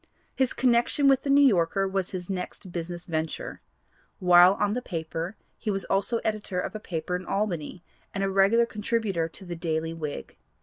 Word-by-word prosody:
His 260 -2 +1
connection 250 +3 +2
with 270 -1 +5
the 280 - -4
New 285 +1 +6
Yorker 195 -3 +3
was 190 -1 -1
his 180 -2 -6
next 185 0 -5
business 175 0 -5
venture. 160 -1 -4 0.6
While 180 0 +7
on 205 0 0
this 250 - -2
paper 165 +1 -4 0.2
he - - -3
was 195 -2 -1
also 200 +4 +1
editor 210 -4 -2
of - - -3
a 215 - -5
paper 180 -3 -3
in 180 - -4
Albany, 180 -4 -2 0.3
and 195 - -2
a 195 - +1
regular 200 +5 +4
contributor 210 -6 -1
to 190 - -10
the 175 -1 -5
Daily 165 -1 -2
Whig. 155 -3 -6
190 Hz, 180 wpm, -27 LUFS, 170-215 Hz, 0.6 s, While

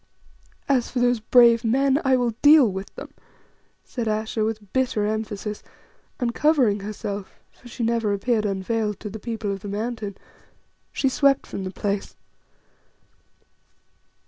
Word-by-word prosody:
"As 260 -4 +1
for - - -6
those 245 -1 +2
'brave 235 +1 +5
men,' 270 +5 +2
I 265 -1 +4
will 245 -2 +1
deal 295 -3 +7
with 190 +1 -5
them," - - -9 0.7
said 235 -3 -4
Ayesha 215 +1 -1
with 215 -3 -4
bitter 255 -5 +1
emphasis, 210 -1 -3 0.6
and 240 -2 -1
covering 265 -10 +3
herself 205 -1 -6
for 245 - -17
she 240 0 -5
never 230 -2 +1
appeared 215 +2 0
unveiled 210 +2 -2
to 210 - -6
the 220 - -7
people 220 -2 -4
of 195 - -4
the 205 - -9
Mountain 210 0 -4 0.7
she 270 - 0
swept 275 +1 +3
from 195 - -6
the - - -3
place. 200 +1 -3
225 Hz, 145 wpm, -24 LUFS, 205-245 Hz, 0.7 s, deal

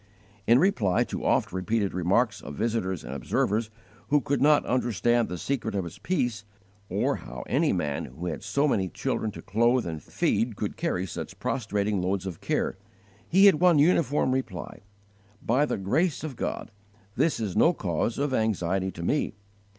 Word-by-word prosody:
In 115 - +6
reply 125 - +2
to - - -5
oft - - +2
repeated 100 +2 -1
remarks 100 +5 +1
of 75 - -8
visitors 100 -4 -1
and 65 - -6
observers 105 - 0 0.4
who 150 +1 +4
could 140 0 -1
not 150 +1 +5
understand 120 -1 +1
the 90 - -4
secret 115 -2 -2
of 95 - 0
his 85 - -9
peace, 120 - -1 0.5
or - - 0
how 60 0 -8
any - - +2
man 75 -2 -1
who 65 +8 -8
had 85 - -3
so 140 +2 +1
many 95 -9 +1
children 110 +7 -2
to 105 - -9
clothe 120 +4 +2
and 80 -3 -5
feed 115 - 0
could 105 0 -3
carry 160 - -1
such 90 - -7
prostrating 105 -5 -1
loads 95 +1 -1
of 90 -4 -6
care, - - -1 0.5
he 190 +4 +6
had 195 -7 +6
one 180 -3 +6
uniform 145 -3 +3
reply: 130 -9 -4 0.6
"By 130 +8 +2
the - - -1
grace 140 - 0
of 150 -5 -5
God, - - -4 0.4
this 160 -5 +1
is 105 -5 -3
no 165 - +5
cause 95 - -2
of 140 -1 -1
anxiety 95 -4 0
to 85 - -7
me. 140 - 0
110 Hz, 175 wpm, -27 LUFS, 95-135 Hz, 0.6 s, In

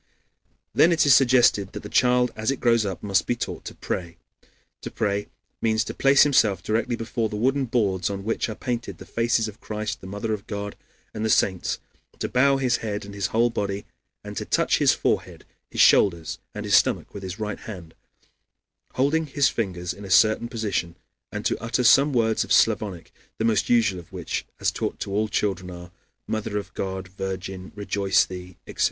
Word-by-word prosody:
Then 170 - +5
it 160 -3 +3
is 140 - +7
suggested 120 -7 +4
that - - -7
the - - -6
child 125 +2 +3
as 110 0 -2
it 135 - -1
grows 115 -3 +3
up 95 - -5
must 95 -4 +1
be 120 - +1
taught - - -5
to - - -7
pray. 85 -2 -4 0.6
To - - -6
pray 100 -1 -1 0.3
means 110 0 +2
to - - -6
place 135 0 +5
himself 105 -10 +3
directly 115 +2 0
before 115 -1 -2
the 105 - -5
wooden 135 +5 +1
boards 105 -7 0
on 100 -1 -5
which 115 +2 -1
are 110 - -5
painted 120 +1 -4
the - - -11
faces 115 -1 +1
of 105 -1 -10
Christ, 105 0 -4
the 95 - -9
Mother 105 +3 -3
of 105 0 -6
God, 100 0 -5 0.4
and 110 - -4
the 110 - 0
saints, 95 -4 +1 0.4
to - - -2
bow 135 +2 +3
his 125 -3 +1
head 105 -2 -4
and 100 - -10
his 100 -2 -1
whole 115 +4 +2
body, 100 -2 -3 0.4
and - - -8
to - - -2
touch - - +1
his - - +5
forehead, - - -2 0.2
his - - 0
shoulders 85 -5 +4 0.2
and - - -5
his - - -1
stomach - - +2
with 100 - -7
his 95 +1 -6
right 105 -1 -3
hand, 90 -7 -9 1.0
holding 150 +5 +1
his 140 0 +2
fingers 90 -6 -3
in 100 - -12
a 100 - -8
certain 110 +5 +4
position, 105 -7 -2 0.4
and - - -5
to - - 0
utter 120 +2 0
some 140 +4 +6
words 110 -4 +2
of - - -10
Slavonic, 95 -6 +2 0.2
the 110 - -1
most 110 -3 +1
usual 110 -6 +3
of 85 - -14
which - - -4
as - - +1
taught - - -4
to 100 - -4
all 105 +2 +1
children 95 -3 -1
are: 90 -1 -10 0.3
Mother 110 -1 -3
of 100 - -6
God, 95 -1 -4
virgin, 95 0 -6
rejoice 100 -1 +2
thee, 90 -1 -9
etc. - - -11
105 Hz, 200 wpm, -24 LUFS, 95-120 Hz, 1.0 s, is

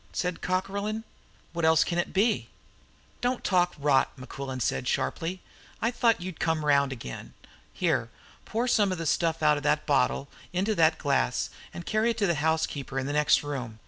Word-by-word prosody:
said 180 -1 -2
Cockerlyne. 200 +4 -2 0.5
"What 170 -1 -3
else 160 0 +5
can 175 - -1
it 175 - -1
be?" 215 +4 +1 0.7
"Don't 245 0 0
talk 180 -2 +2
rot!" 140 -2 +3
said - - -17
Mequillen 130 -2 -3
sharply. 175 +7 -2 0.4
"I 230 - +1
thought 235 -3 +2
you'd 180 -1 -7
come 160 -2 0
round 140 -2 +3
again. 115 - -8 0.4
Here, - - 0 0.3
pour 235 +3 -1
some 205 -5 +3
of 185 - -2
the 165 - -4
stuff 165 0 +1
out 150 -1 +5
of - - -4
that 150 0 +1
bottle 140 -1 +1 0.3
into 195 +5 +1
that 160 -4 +4
glass, - - 0 0.2
and 170 - -8
carry 215 +2 +1
it 230 - -1
to 210 - +2
the 170 - +2
housekeeper 155 -4 -1
in 135 - -1
the 145 - -2
next 150 0 +4
room. 125 -6 -5
165 Hz, 180 wpm, -28 LUFS, 145-195 Hz, 0.7 s, else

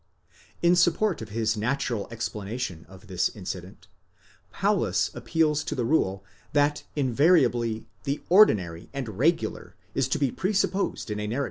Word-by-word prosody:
In 175 +1 +5
support 180 - +2
of 110 - -7
his 110 +1 0
natural 120 -1 -1
explanation 110 -4 -5
of: 95 +2 -14
this 90 -4 0
incident, 95 -2 -7 0.7
Paulus - - +1
appeals 155 -2 +1
to - - -3
the 125 -4 -1
rule, 100 -9 +1 0.3
that 145 0 +2
invariably 125 -5 +2 0.2
the 140 +1 -1
ordinary 95 - +4
and 115 -7 -5
regular 165 +6 0 0.2
is - - +1
to - - 0
be 140 -4 +1
presupposed 195 - -1
in 105 - -3
a 105 - -3
narra 110 - -3
1 - - -2
Exeg. - - 0
120 Hz, 150 wpm, -26 LUFS, 105-150 Hz, 0.7 s, In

